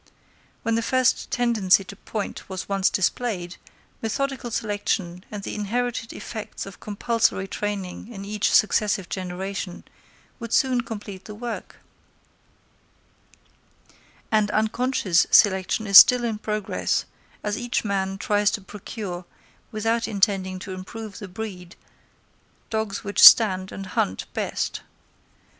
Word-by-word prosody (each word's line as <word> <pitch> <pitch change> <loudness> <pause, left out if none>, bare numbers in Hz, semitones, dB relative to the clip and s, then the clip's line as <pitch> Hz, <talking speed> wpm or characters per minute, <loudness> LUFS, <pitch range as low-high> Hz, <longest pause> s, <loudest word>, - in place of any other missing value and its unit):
When 230 - 0
the 230 - +1
first 255 +2 +1
tendency 220 -6 +3
to 200 - -10
point 205 0 -6
was 190 -1 -5
once 195 -1 +2
displayed, 190 -2 -1 0.4
methodical 260 +2 -2
selection 205 -5 -2
and 205 -2 -7
the - - -5
inherited 230 +2 -2
effects 220 -2 -7
of 195 -2 -11
compulsory 215 -2 0
training 200 -1 -4
in 200 -4 -8
each 210 0 0
successive 205 -3 +2
generation 185 0 -5 0.6
would 230 -1 -6
soon 255 -2 +3
complete 210 -4 -8
the 210 - -8
work; 235 +2 -6 2.6
and 215 -2 +3
unconscious 215 -4 +1
selection 190 +2 +4
is 200 -1 +11
still 250 -1 +6
in 225 -3 -2
progress, 210 -2 -1 0.4
as 210 0 -1
each 240 -2 -2
man 195 -1 -1
tries 205 -1 +2
to 210 - -3
procure, 190 -2 -7 0.5
without 225 +1 0
intending 195 -3 +1
to 190 +1 -8
improve 200 +3 -8
the 205 - -7
breed, 180 -3 -7 1.0
dogs 220 -2 -2
which 205 -1 -1
stand 190 -4 +8
and 195 - -7
hunt 95 - -1
best. - - -2
205 Hz, 120 wpm, -24 LUFS, 190-225 Hz, 2.6 s, is